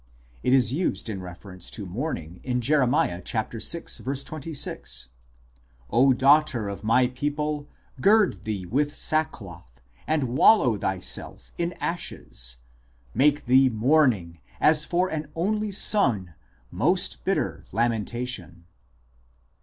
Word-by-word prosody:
It - - +1
is 130 -3 +4
used 155 -7 -1
in 95 -3 -5
refer 90 +2 -10
ence 90 -1 -8
to 105 - -5
mourning 90 - -5
in 125 -1 -1
Jer. 135 +2 +3
vi. 90 -7 +1
26: 115 +9 -3
"0 135 +2 -2 2.0
daughter 135 -3 +3
of 100 0 -7
my 115 +4 +4
people, 145 +3 -3 0.3
gird 200 - +4
thee 105 -4 -3
with 145 +9 0
sackcloth, 90 - -3 0.3
and 155 -2 +1
wallow 130 - +4
thyself 95 -2 -3
in 170 +1 -1
ashes: - - -4 0.6
make 145 +4 +2
thee 130 +2 +5
mourning, 115 - +2 0.2
as 155 0 +5
for 180 +3 +1
an 155 -3 -4
only 210 +5 0
son, 130 - +2 0.4
most - - +1
bitter - - -1
lamentation." 115 -5 -2
125 Hz, 115 wpm, -25 LUFS, 100-150 Hz, 2.0 s, thee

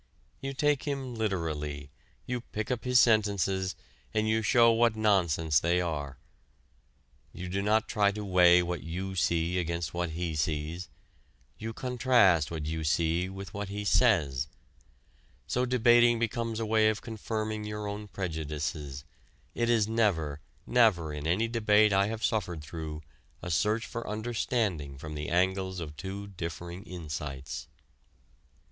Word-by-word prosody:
You 135 0 -4
take 145 0 +1
him 135 -3 -3
literally, 75 -9 -3 0.3
you 125 -1 -3
pick 110 -1 -5
up 125 -1 -2
his 125 -1 +5
sentences, 100 -5 +2 0.4
and 110 0 +2
you 110 +1 +2
show 115 +2 +5
what 115 -1 +3
nonsense 85 -8 +2
they 85 +2 +2
are. 75 -6 -3 1.2
You 90 0 -6
do 95 +2 -1
not 110 +3 +2
try 105 -3 +2
to 105 0 -5
weigh 90 -2 +6
what 90 0 -3
you 95 +4 -5
see 85 0 +1
against 85 -2 -2
what 85 -1 -1
he 85 -2 -2
sees; 80 +3 -2 0.7
you 110 +1 -4
contrast 120 - +3
what 80 -3 -4
you 80 +1 -3
see 85 +3 +1
with 95 -2 -8
what 100 -1 -4
he 105 +1 -4
says. 75 - +3 1.0
So 125 +1 0
debating 120 -1 +5
becomes 115 0 -2
a 115 - -1
way 110 0 +4
of 110 - -3
confirming 110 -1 -3
your 105 0 -4
own 105 +1 -5
prejudices; 75 -6 -4 0.5
it 120 0 0
is 110 -3 +3
never, 85 -10 0 0.2
never 100 -11 +3
in 75 +1 -4
any 100 +8 +2
debate 110 -2 +4
I 100 +1 +3
have 110 0 -4
suffered 90 -7 -1
through, 80 0 -6 0.4
a 90 - -4
search 105 +8 +1
for 115 -2 -6
understanding 105 - -1
from 75 +3 -7
the 75 0 -4
angles 95 +1 +1
of 75 -3 -6
two 95 +7 -6
differing 85 0 -6
insights. 75 - -6
95 Hz, 145 wpm, -29 LUFS, 80-110 Hz, 1.2 s, weigh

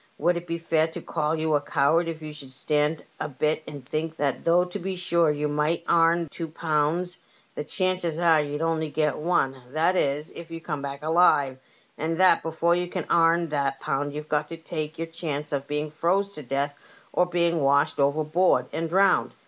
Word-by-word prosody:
Would 175 0 +2
it 170 0 -5
be 170 - -2
fair 160 -1 +1
to 160 - -7
call 155 -1 -1
you 160 0 0
a 145 - +3
coward 150 +3 +2
if 160 -1 -5
you 155 -1 -6
should 140 -3 -11
stand 150 +3 0
a - - -3
bit 150 +4 0
and 140 -3 -8
think 160 +1 -3
that 140 -3 -1
though 175 +2 +4
to 180 - -6
be 190 +1 -3
sure 170 -2 +2
you 150 0 0
might 150 +3 0
aim 170 0 +3
two 165 - -5
pounds, 160 +3 -1 0.3
the - - -4
chances 185 -1 -1
are 165 -3 +5
you'd 145 +1 -3
only 160 -1 0
get 150 0 0
one, 150 -5 +1 0.2
that 165 +4 +2
is, 145 -2 0
if 170 0 -10
you 165 0 -6
come 150 -3 -4
back 140 +1 -6
alive; 155 -5 +3 0.4
and 165 +2 -2
that 185 -3 +5
before 165 +1 +1
you 175 0 0
can 180 -2 -4
airn 170 0 +4
that 140 -2 -1
pound 145 +1 -2
you've 150 0 -5
got 150 0 0
to 165 - -7
take 155 -1 -5
your 165 - -2
chance 155 -3 -5
of 140 -1 -2
being 150 +1 -2
froze 190 +6 0
to 150 - -8
death 140 +2 -2 0.4
or 180 - +3
being 170 -2 +1
washed 140 +1 +2
overboard 155 0 +2
and 165 0 -2
drowned 195 +3 +3
160 Hz, 205 wpm, -26 LUFS, 150-170 Hz, 0.4 s, are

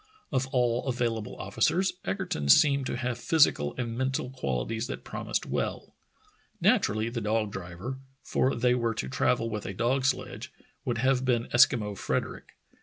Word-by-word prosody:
Of 130 -1 0
all 125 0 +1
available 120 -4 -1
officers 190 +2 +1
Egerton 180 - -2
seemed 140 - +5
to - - -2
have 125 -1 -2
physical 145 - +3
and 115 -2 -3
mental 130 0 -1
qualities 110 - -2
that - - -6
promised - - -3
well. - - -3 0.7
Naturally 110 +2 +2
the 115 0 -4
dog 110 0 0
driver 95 +8 -6
— 135 - -40
for 130 - +2
they 125 +1 +3
were 115 -2 0
to 65 - -3
travel 115 - +1
with 105 -2 -4
a 95 - -5
dog 130 +5 +1
sledge 135 - -2 0.2
— - - -38
would - - -1
have 130 +1 +2
been 120 -3 +2
Eskimo 120 -4 +4
Frederick. - - -3
120 Hz, 165 wpm, -28 LUFS, 110-130 Hz, 0.7 s, seemed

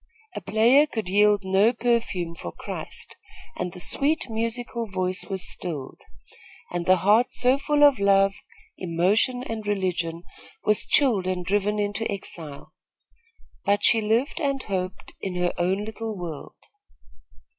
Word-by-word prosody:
A - - -4
player 235 +9 +4
could 220 -9 -4
yield 205 +1 +4
no 195 +5 +3
perfume 230 -8 -1
for 85 - -7
Christ, - - -8 0.4
and 180 0 -3
the 180 - -10
sweet, 280 - +1
musical 230 +1 -3
voice 185 -1 -2
was 190 -2 -2
stilled, 150 -7 -4 0.7
and 175 -1 -3
the 185 - +7
heart 220 +5 +4
so 255 +2 +2
full 295 +1 +2
of 285 -5 +6
love, 195 0 +4 0.5
emotion 190 +9 +1
and 225 -4 -5
religion 175 -4 -1 0.4
was 210 -1 +2
chilled 225 -10 +3
and 180 -1 -2
driven 205 +2 0
into 205 +2 -1
exile; 160 -7 -7 0.9
but 205 +1 +1
she 225 -2 +5
lived 225 +9 0
and 275 -2 -1
hoped 185 -2 -4
in 190 -2 -4
her 180 0 0
own 190 +4 0
little 220 -1 -5
world. 165 -5 -7
205 Hz, 140 wpm, -25 LUFS, 185-230 Hz, 0.9 s, the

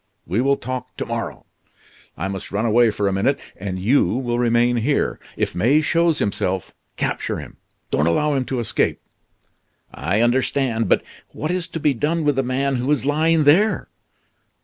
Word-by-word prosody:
we 95 +8 0
will 140 +1 +2
talk 130 0 -6
to - - -3
morrow. - - -5 0.7
I 90 - -2
must 95 -1 -6
run 105 +4 -1
away 115 +1 +4
for 105 -1 -1
a 100 - 0
minute, 110 +9 +1 0.2
and 95 -1 -5
you 115 +10 +3
will 120 -2 -1
remain 120 0 +3
here. 135 +6 0 0.2
If - - -1
May 125 +11 +3
shows 165 +1 +2
himself, 95 - -2 0.2
capture - - -2
him; - - -10 0.3
don't 75 - +2
allow 150 - +2
him 135 -2 0
to 130 -1 -2
escape." 115 - 0 0.9
"I 95 +10 0
understand; 120 -2 +1
but - - +3 0.3
what 155 +3 -3
is 180 -1 -2
to 165 - -5
be 150 -2 +2
done 155 +6 0
with 145 -2 +2
the 135 - +2
man 135 +1 0
who 125 +3 -2
is 145 -3 +1
lying 155 +2 +3
there?" 185 +10 +3
130 Hz, 175 wpm, -21 LUFS, 110-145 Hz, 0.9 s, away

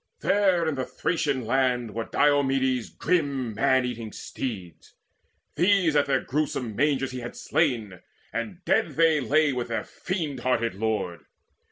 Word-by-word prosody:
There 190 -4 +2
in 160 - +1
the 130 -2 -2
Thracian 145 -4 -1
land 125 -2 +1
Were 115 +1 -3
Diomedes' 135 -4 +2
grim 140 -9 -1
man 130 +3 +2
eating 115 -3 -5
steeds: 95 -10 -7 0.6
These 175 -1 +3
at 145 -1 +3
their 140 - +2
gruesome 130 -6 -2
mangers 135 0 +1
had 125 -2 -6
he - - -14
slain, 115 - 0 0.3
And - - -5
dead - - +2
they 160 -1 +4
lay 145 +3 +2
with 125 -1 -3
their 115 - -2
fiend 160 -8 -4
hearted 115 -4 0
lord. 105 -4 -3
130 Hz, 145 wpm, -26 LUFS, 120-150 Hz, 0.6 s, they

